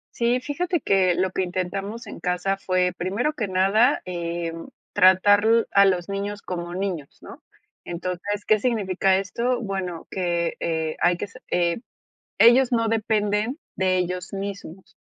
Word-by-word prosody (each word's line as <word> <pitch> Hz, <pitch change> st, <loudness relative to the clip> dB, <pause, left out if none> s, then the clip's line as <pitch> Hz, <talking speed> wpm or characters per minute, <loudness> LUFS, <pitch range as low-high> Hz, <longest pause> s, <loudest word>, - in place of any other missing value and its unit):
Sí, 240 Hz, +1 st, +1 dB
fíjate 335 Hz, +4 st, -2 dB
que 185 Hz, -3 st, +3 dB
lo 185 Hz, +1 st, 0 dB
que -, -, -1 dB
intentamos 195 Hz, +5 st, -3 dB
en 205 Hz, -, -9 dB
casa 180 Hz, +2 st, -1 dB
fue, 185 Hz, -1 st, +1 dB
primero 205 Hz, +11 st, -1 dB
que 240 Hz, -9 st, -3 dB
nada, 195 Hz, +8 st, +3 dB
em, 170 Hz, -2 st, -4 dB, 0.2 s
tratar 195 Hz, +3 st, +5 dB
l 230 Hz, +1 st, +4 dB
a 200 Hz, 0 st, +6 dB
los 185 Hz, -1 st, +1 dB
niños 200 Hz, +1 st, -4 dB
como 175 Hz, -1 st, -5 dB
niños, 180 Hz, -7 st, -4 dB
¿no?, -, -, -12 dB, 0.4 s
entonces, 185 Hz, +4 st, -4 dB
¿qué 215 Hz, -1 st, +3 dB
significa 195 Hz, -5 st, +1 dB
esto?, 235 Hz, +6 st, -1 dB
bueno, 190 Hz, -5 st, -4 dB
que, 175 Hz, -2 st, -1 dB
eh, 160 Hz, -1 st, -2 dB
hay 175 Hz, 0 st, +3 dB
que 205 Hz, -, -4 dB
se 205 Hz, -, -15 dB
eh, 170 Hz, -1 st, +1 dB, 0.6 s
ellos 245 Hz, +2 st, +6 dB
no 230 Hz, -1 st, +2 dB
dependen 215 Hz, +2 st, 0 dB, 0.2 s
de 185 Hz, 0 st, +1 dB
ellos 180 Hz, 0 st, -3 dB
mismos. 195 Hz, -2 st, -7 dB
195 Hz, 150 wpm, -24 LUFS, 180-215 Hz, 0.6 s, a